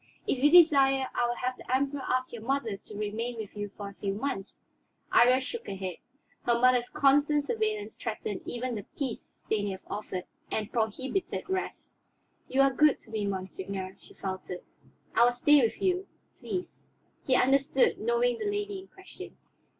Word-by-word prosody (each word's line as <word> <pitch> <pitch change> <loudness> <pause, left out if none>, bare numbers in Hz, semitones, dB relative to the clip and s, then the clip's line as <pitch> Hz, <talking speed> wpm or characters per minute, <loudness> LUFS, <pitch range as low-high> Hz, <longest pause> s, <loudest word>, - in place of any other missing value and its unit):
If 260 0 -1
you 295 - +7
desire, 275 -6 +6
I 240 - +1
will 240 - -1
have 250 +1 -2
the - - -9
Emperor 280 +1 0
ask 255 -1 -1
your 235 - -6
mother 250 -3 -1
to 205 +1 -11
remain 225 +3 -3
with 215 -2 -7
you 205 0 -4
for 205 0 -8
a - - -12
few 195 0 -3
months." 210 -4 -4 0.6
Iría 250 +2 +6
shook 455 - -6
her 195 - -4
head. 185 -3 -4 0.5
Her 235 -1 +2
mother's 250 -1 +4
constant 290 +1 +3
surveillance 430 +2 -1
threatened - - -4
even 245 +1 -3
the 210 -3 -5
peace 265 -5 -2
Stanief 205 -3 -3
offered, 200 -3 -4 0.3
and 215 -1 -2
prohibited 260 - -1
rest. 380 0 -4 0.5
"You 270 - +2
are 275 0 +4
good 300 +2 +5
to 225 - -17
me, 210 -2 -1
monseigneur," 190 0 -4
she - - -17
faltered. 185 -2 -5 0.5
"I 235 - +5
will 245 - +6
stay 290 +4 +5
with 230 - 0
you, 370 0 +1 0.3
please." 365 -1 -5 0.5
He 260 - +4
understood, 275 - +3
knowing 480 0 +1
the 425 -2 -1
lady 410 -1 -2
in 380 - -12
question. 380 0 -12
255 Hz, 175 wpm, -29 LUFS, 210-295 Hz, 0.6 s, you